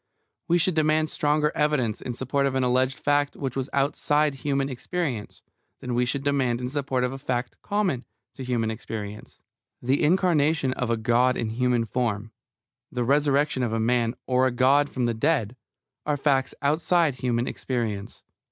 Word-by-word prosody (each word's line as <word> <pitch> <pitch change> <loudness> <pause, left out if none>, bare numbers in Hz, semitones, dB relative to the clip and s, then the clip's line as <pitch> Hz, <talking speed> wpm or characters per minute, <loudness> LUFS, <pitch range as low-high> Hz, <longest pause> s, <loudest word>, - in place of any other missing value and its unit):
We 175 0 +4
should 175 +2 +2
demand 155 0 +2
stronger 150 +1 +1
evidence 145 -8 0
in 120 - -5
support 140 +2 0
of 135 - -2
an 130 - +1
alleged 130 +1 +1
fact 145 0 +1
which 135 -3 -4
was 135 0 -2
outside 145 +1 +1
human 135 0 -1
experience 135 - -4 0.4
than 125 - -4
we 125 +1 +1
should 140 +2 -2
demand 135 -4 +1
in 125 0 -3
support 135 -2 -1
of 125 - 0
a 135 - -7
fact 125 -2 -3
common 190 -11 -1 0.3
to 135 - -8
human 120 -3 -1
experience. 105 -2 -7 0.4
The 130 +3 +1
incarnation 155 -4 +2
of 125 -3 -3
a 115 - +1
God 120 +3 +2
in 110 -1 -2
human 120 0 +1
form, 110 -1 -2 0.6
the 125 -1 -1
resurrection 140 +1 +2
of 120 -3 -1
a 115 - 0
man 120 +1 +1
or 130 0 +3
a - - 0
God 135 +4 +3
from 125 -2 -1
the 120 - +1
dead, 115 -1 0 0.5
are 150 -1 0
facts 135 -2 +1
outside 155 +1 +2
human 120 -1 0
experience. 110 -6 -4
130 Hz, 170 wpm, -25 LUFS, 120-145 Hz, 0.6 s, We